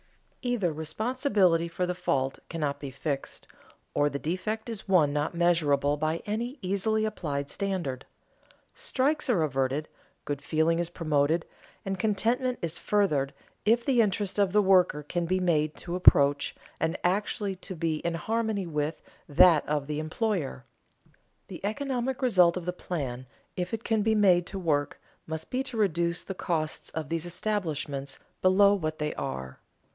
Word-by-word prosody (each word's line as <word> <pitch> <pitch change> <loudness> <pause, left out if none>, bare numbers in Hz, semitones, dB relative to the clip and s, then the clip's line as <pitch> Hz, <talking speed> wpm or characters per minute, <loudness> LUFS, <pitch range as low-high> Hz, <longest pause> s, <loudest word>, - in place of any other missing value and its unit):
Either 230 -10 0
responsibility 185 - +1
for 175 +2 -2
the 180 - -1
fault 135 -6 -1
cannot 150 -4 -2
be 140 - -5
fixed, 140 +1 -4 0.5
or 145 - +3
the 140 - -3
defect 185 +9 -3
is 225 -4 -5
one 165 -7 +4
not 150 +3 -1
measurable 150 -5 +3
by 155 +2 -1
any 235 +6 -3
easily 215 +4 +1
applied 145 -9 -3
standard. 175 -10 -2 0.7
Strikes 305 - 0
are 190 -10 +3
averted, 135 +1 0 0.4
good 145 -1 -3
feeling 160 +1 +1
is 170 -1 -1
promoted, 155 -1 +1 0.4
and 195 -1 -2
contentment 235 +5 +1
is 170 0 -3
furthered 155 -10 +1 0.3
if 230 +2 +3
the 255 -4 +4
interest 205 -1 0
of 200 -2 +3
the 210 +2 +4
worker 180 -6 +4
can 170 +3 -2
be 185 +2 +1
made 155 -4 +1
to 175 0 -4
approach, 145 -5 +5 0.2
and 160 +1 0
actually 200 +2 0
to 185 +1 -7
be 160 -1 -1
in 170 +2 -2
harmony 220 +2 -1
with, 150 -1 -3 0.3
that 155 +1 +6
of 150 -2 0
the 150 +1 -3
employer. 155 - -2 0.8
The - - -9
economic 260 +3 -2
result 180 -8 +5
of 180 - -5
the 180 - -1
plan, 130 -9 -4 0.3
if 180 0 -3
it 225 0 -3
can 225 -2 +1
be 220 +1 +2
made 180 -4 +4
to 195 - -6
work, 150 -6 0 0.3
must 160 0 -5
be 255 - 0
to 265 -3 -5
reduce 170 -4 +1
the 195 - -5
costs 160 -4 -2
of 155 -3 -5
these 165 +1 -2
establishments 155 -8 -2 0.2
below 200 +2 +6
what 155 -5 -2
they 150 0 -2
are. 65 0 -5
175 Hz, 160 wpm, -28 LUFS, 150-205 Hz, 0.8 s, that